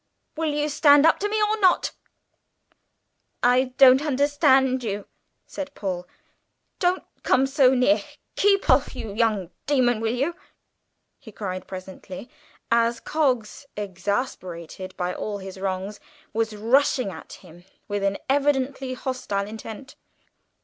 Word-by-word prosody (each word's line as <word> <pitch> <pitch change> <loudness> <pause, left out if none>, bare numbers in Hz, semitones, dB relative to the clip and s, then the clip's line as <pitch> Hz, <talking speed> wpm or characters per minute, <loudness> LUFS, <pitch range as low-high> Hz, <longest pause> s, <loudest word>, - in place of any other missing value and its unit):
Will 320 -1 -1
you 295 0 0
stand 295 -1 +5
up 325 - +4
to 415 - -1
me 430 +1 0
or 425 +1 +1
not?" 370 -3 +3 1.5
"I 250 +2 +4
don't 265 0 +8
understand 270 -3 +2
you," 205 -2 -3 0.4
said 285 -1 -7
Paul. 180 -3 -4 0.7
"Don't 360 0 +1 0.2
come 260 +1 +3
so 270 -1 +4
near. 260 +5 +3 0.3
Keep 395 -1 +3
off, - - +3
you 210 - -6
young 210 -5 0 0.2
demon, 250 -5 +2
will 225 +1 -1
you!" 285 +7 -1 0.8
he 240 -6 -13
cried 185 -3 -5
presently, 190 +4 -9 0.4
as 235 0 +2
Coggs, 265 -5 -1
exasperated 185 -3 -4
by 180 0 -2
all 210 +2 -4
his 190 -1 -9
wrongs, 195 +2 -3 0.3
was 225 0 -1
rushing 240 0 +2
at - - -11
him 175 -1 -15 0.2
with 205 -1 -2
an 195 0 0
evidently 270 -1 0
hostile 250 -7 -3
intent. 220 +5 -9
245 Hz, 130 wpm, -24 LUFS, 200-285 Hz, 1.5 s, don't